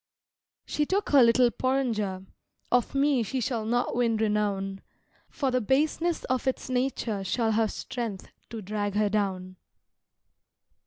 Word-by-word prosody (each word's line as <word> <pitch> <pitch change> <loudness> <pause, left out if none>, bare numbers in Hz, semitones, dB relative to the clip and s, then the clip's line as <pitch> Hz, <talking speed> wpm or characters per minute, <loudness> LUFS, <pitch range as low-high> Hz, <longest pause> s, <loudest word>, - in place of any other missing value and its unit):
She 295 -1 -1
took 400 +2 0
her 280 -2 +6
little 240 +1 +5
porringer: 225 -9 -1 0.5
Of 245 +2 +1
me 275 -2 +3
she 245 +4 -2
shall 230 -3 -2
not 240 +2 0
win 235 -2 +2
renown: 205 -3 -1 0.5
For 270 -3 -1
the 255 0 +1
baseness 310 +8 +1
of 255 0 -1
its 260 0 -2
nature 245 -5 -1
shall 225 +3 0
have 220 -1 +1
strength 230 -6 -5 0.2
to 225 -2 -7
drag 205 0 -3
her 210 0 +2
down. 190 -3 -2
230 Hz, 140 wpm, -27 LUFS, 210-260 Hz, 0.5 s, her